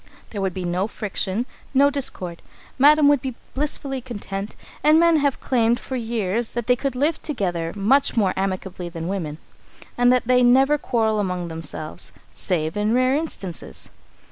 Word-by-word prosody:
There 205 - -4
would 190 -2 -1
be 185 -1 -3
no 180 +3 0
friction, 210 +1 -2 0.3
no 280 +2 +5
discord. 185 -11 -2 0.4
Madam 295 +2 +6
would 285 -3 +4
be 260 -3 -4 0.2
blissfully 275 -2 -1
content, 205 -4 -6 0.3
and 305 +1 +6
men 335 -1 +5
have 285 -2 +1
claimed 235 -2 +1
for 260 - -6
years 225 -2 -2
that 240 -2 -2
they 250 - +4
could 270 0 -3
live 295 +5 0
together 175 - -2
much 240 +7 +2
more 195 -4 +3
amicably 185 -2 -3
than 165 -1 -6
women, 170 -6 -3 0.6
and 245 0 +5
that 250 -1 +2
they 250 +1 +4
never 265 +4 +5
quarrel 220 -5 0
among 180 -3 -2
themselves, 160 -1 -2 0.2
save 160 -4 -1
in 210 +2 +1
rare 255 +1 +3
instances. 205 - -5
225 Hz, 165 wpm, -22 LUFS, 185-265 Hz, 0.6 s, Madam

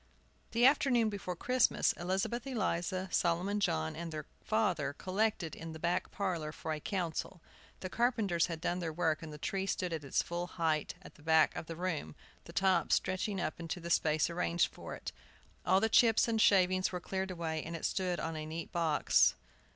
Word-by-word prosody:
The 235 +1 +3
afternoon 260 -5 +4
before 195 -3 -4
Christmas, 250 +6 +2
Elizabeth 195 +8 -2
Eliza, 185 -6 -1
Solomon 180 +4 +1
John, 80 - 0
and 170 0 -5
their 155 -2 -5 0.2
father 185 -10 +1
collected 190 -1 -1
in 165 0 -7
the 160 - -8
back 170 +2 0
parlor 175 -6 -2
for 160 0 -4
a 155 - -4
council. 175 0 -3 0.4
The 185 - -4
carpenters 220 -9 +1
had 165 -2 -5
done 180 +1 -1
their 165 -2 -3
work, 160 -1 0
and 160 -1 -7
the 150 - -8
tree 195 +5 -2
stood 180 -3 -1
at 160 -2 -3
its 135 - 0
full 175 +1 -3
height 160 -4 -1
at - - -12
the - - -19
back 160 0 +4
of 160 - -5
the 165 - -5
room, 160 - -3 0.3
the - - -10
top 185 -4 +2
stretching 185 +1 0
up 155 -2 -3
into 170 +1 -4
the 170 0 -5
space 155 -2 +3
arranged 170 0 0
for - - -7
it. - - -6 0.6
All 190 +1 +5
the 220 - +2
chips 225 0 +5
and 225 -1 +1
shavings 185 -2 +4
were 180 - -3
cleared 190 +2 -3
away, 165 -3 -3
and 165 +2 -6
it 165 - -4
stood 180 -2 0
on 160 0 -3
a 155 - -4
neat 160 +2 -6
box. 150 - +3
175 Hz, 195 wpm, -33 LUFS, 160-195 Hz, 0.6 s, All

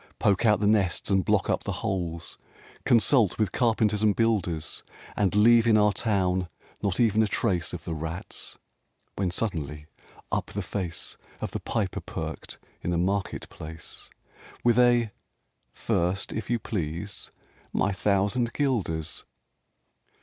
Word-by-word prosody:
Poke 100 +3 +3
out 105 -3 +4
the 105 - 0
nests 100 -2 +2
and 95 -1 +3
block - - +2
up - - +1
the - - -2
holes! 85 -3 -3 0.5
Consult 115 -3 +4
with 110 -2 +1
carpenters 110 -4 +2
and 105 -2 +3
builders, 95 -9 0 0.3
And 100 -2 +1
leave 115 +2 +6
in 110 -2 +6
our 105 -1 +4
town 95 -5 0 0.3
not 100 -3 0
even 110 -2 +4
a 110 - +3
trace 95 -5 0
Of 85 -3 -6
the 80 - -4
rats!" 80 +3 -5 0.6
when 95 -2 0
suddenly, 75 -7 -3 0.5
up - - 0
the 100 - -4
face 90 -2 -4 0.2
Of - - -4
the - - -3
Piper 105 -5 -2
perked - - -6 0.2
in - - -3
the 85 - +1
market 95 +3 -1
place, 80 +1 -9 0.5
With 120 0 +4
a 120 -3 +4 0.6
"First, 90 +9 -1
if 110 -2 -4
you 120 - +2
please, 95 -2 -4 0.4
my 100 - +1
thousand 100 +5 +1
guilders!" 95 - -1
100 Hz, 140 wpm, -27 LUFS, 85-110 Hz, 0.6 s, leave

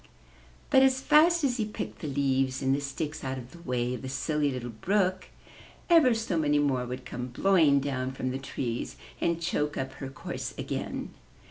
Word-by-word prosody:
But 265 - +7
as 265 -1 +4
fast 315 +4 +5
as 255 -3 +2
he 220 - 0
picked 110 - -6
the - - -5
leaves 135 -1 0
and 135 0 +3
the 140 - 0
sticks 150 +3 -4
out 130 0 -3
of 125 0 -9
the 170 - -13
way 125 -4 -1
of 125 - -5
the 130 - -5
Silly 150 +2 0
Little 120 -2 -5
Brook, 185 - 0 0.6
ever 295 -8 +6
so 220 -7 -1
many 150 -1 +2
more 135 -4 +1
would 125 +1 -6
come 125 0 -5
blowing 155 +1 +4
down 130 -2 -2
from 130 -1 -3
the 130 - -3
trees 120 -3 -4 0.3
and 170 -1 +1
choke 150 -3 -1
up 135 0 -2
her 135 0 -7
course 135 - -6
again. - - -4
140 Hz, 195 wpm, -28 LUFS, 130-180 Hz, 0.6 s, But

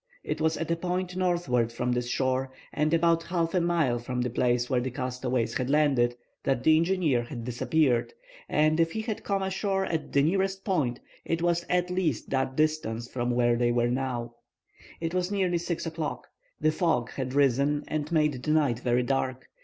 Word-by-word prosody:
It 155 - -3
was 160 0 +2
at 165 0 -3
a - - +3
point 180 +1 -3
northward 170 -11 +1
from 125 +1 -2
this 125 0 -1
shore, 130 +1 0 0.2
and 150 +1 +1
about 165 0 +3
half 165 -1 -1
a 180 - +3
mile 165 -8 +1
from 125 +1 -4
the 125 -1 -1
place 120 0 +1
where 125 -2 +1
the 130 - -2
castaways 125 -1 -2
had 125 0 -2
landed, 135 -5 +3 0.3
that 130 -2 0
the 155 - +6
engineer 165 -6 +2
had 120 0 -7
disappeared, 125 +1 +1 0.4
and 155 +1 +3
if 165 0 +2
he 220 - -2
had 220 -1 -4
come 195 -1 0
ashore 195 0 -1
at 160 -2 -3
the 140 - +3
nearest 190 +4 0
point 145 - 0 0.2
it 165 0 -2
was 175 0 +1
at 180 0 +1
least 175 - -1
that 130 -1 0
distance 150 -7 0
from 120 -1 -2
where 120 -1 +3
they 120 0 +2
now 120 +1 0
were. 120 - -9 0.7
It 165 0 -3
was 180 0 0
nearly 185 -4 +1
6 170 0 -3
o'clock. 160 -1 -4 0.3
The 155 - +3
fog 155 -9 0
had 130 -1 -4
risen 140 +2 +2
and 155 +1 -3
made 150 -5 +2
the 150 - -4
night 145 -7 +2
very 125 0 +1
dark. 130 0 -1
150 Hz, 195 wpm, -28 LUFS, 125-170 Hz, 0.7 s, the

